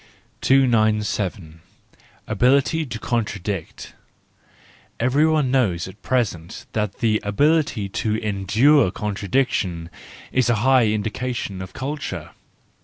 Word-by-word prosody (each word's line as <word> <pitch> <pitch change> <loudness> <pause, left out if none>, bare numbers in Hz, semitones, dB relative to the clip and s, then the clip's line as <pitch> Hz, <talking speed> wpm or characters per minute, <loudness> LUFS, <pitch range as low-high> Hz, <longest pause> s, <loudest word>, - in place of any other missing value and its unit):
297. 110 -9 +1 0.6
Ability 135 +8 +2
to 120 -3 -5
Contradict 105 -6 -4 1.1
—Everyone 145 +2 +2
knows 95 -11 +1
at 95 +2 -13
present 95 -10 -2
that 105 -2 -2
the 110 -2 +2
ability 145 0 +1
to 105 +2 -2
endure 110 +6 +3
contradiction 100 -4 -2 0.4
is 130 -2 +2
a 120 - +3
high 130 -4 +5
indication 110 -1 -3
of 95 0 -8
culture. 140 +3 -5
110 Hz, 95 wpm, -22 LUFS, 100-130 Hz, 1.1 s, high